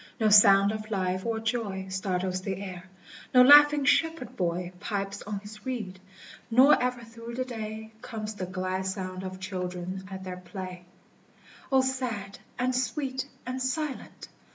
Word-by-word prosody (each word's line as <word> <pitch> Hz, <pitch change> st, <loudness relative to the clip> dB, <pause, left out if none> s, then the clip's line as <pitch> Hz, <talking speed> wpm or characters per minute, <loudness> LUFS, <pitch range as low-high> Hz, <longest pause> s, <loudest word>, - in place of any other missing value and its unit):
no 220 Hz, -1 st, +3 dB
sound 200 Hz, -1 st, +7 dB
of 215 Hz, 0 st, -6 dB
life 185 Hz, -2 st, -1 dB
or 225 Hz, -1 st, -1 dB
joy 220 Hz, -4 st, -2 dB
Startles 185 Hz, -1 st, -2 dB
the 190 Hz, 0 st, -3 dB
air; 185 Hz, -2 st, -7 dB, 0.5 s
no 250 Hz, -, +9 dB
laughing 290 Hz, +1 st, +8 dB
shepherd 275 Hz, -4 st, +1 dB
boy 175 Hz, 0 st, -1 dB
Pipes 200 Hz, -1 st, -3 dB
on 210 Hz, -1 st, -3 dB
his 210 Hz, 0 st, -11 dB
reed, 215 Hz, -8 st, -4 dB, 0.5 s
nor 260 Hz, +5 st, +6 dB
ever 250 Hz, -1 st, -1 dB
through 230 Hz, +1 st, -9 dB
the 255 Hz, +1 st, -1 dB
day 220 Hz, -2 st, -6 dB
Comes 215 Hz, -1 st, -5 dB
the 190 Hz, -3 st, -5 dB
glad 185 Hz, 0 st, -2 dB
sound 185 Hz, -1 st, -4 dB
of 185 Hz, 0 st, -6 dB
children 185 Hz, -1 st, -4 dB
at 190 Hz, -1 st, -7 dB
their 185 Hz, -1 st, -6 dB
play: 180 Hz, 0 st, -8 dB, 0.9 s
O 265 Hz, -1 st, +5 dB
sad, 250 Hz, -7 st, -3 dB, 0.2 s
and 255 Hz, +1 st, 0 dB
sweet, 260 Hz, +2 st, -2 dB, 0.2 s
and 255 Hz, +1 st, -4 dB
silent 270 Hz, +2 st, -3 dB
210 Hz, 155 wpm, -28 LUFS, 185-250 Hz, 0.9 s, no